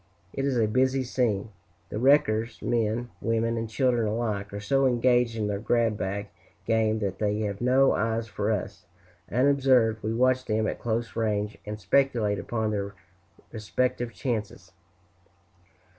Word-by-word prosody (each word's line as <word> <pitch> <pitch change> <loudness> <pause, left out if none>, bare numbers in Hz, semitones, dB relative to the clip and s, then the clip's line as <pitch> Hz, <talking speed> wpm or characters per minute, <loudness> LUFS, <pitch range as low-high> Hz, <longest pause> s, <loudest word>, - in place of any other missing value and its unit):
It 135 - -2
is 135 -3 0
a 115 - +3
busy 130 +4 +1
scene; 115 -5 -1 0.4
the 105 - -4
wreckers, 115 -4 +3
men, 115 0 -1
women, 115 +1 0
and 115 -1 -3
children 120 -2 +1
alike, 105 -2 -2
are 100 - -5
so 135 +6 +2
engaged 120 -1 +2
in 110 -2 -1
their 100 -1 -2
grab 115 0 +1
bag 100 +1 -4 0.4
game 110 -1 +2
that 95 -2 -3
they 105 0 0
have 100 -1 -3
no 130 +2 +4
eyes 115 +1 -1
for 105 0 -2
us; 105 -4 -4 0.4
unobserved, 125 -3 +3
we 110 - -2
watch 130 +2 +2
them 110 -1 0
at - - -3
close 115 0 -2
range, 105 -2 -1
and 105 0 -5
speculate 115 -5 +1
upon 110 -2 -2
their 100 -1 -3 0.6
respective 120 +2 -2
chances. 110 -7 -4
115 Hz, 150 wpm, -27 LUFS, 105-125 Hz, 0.6 s, no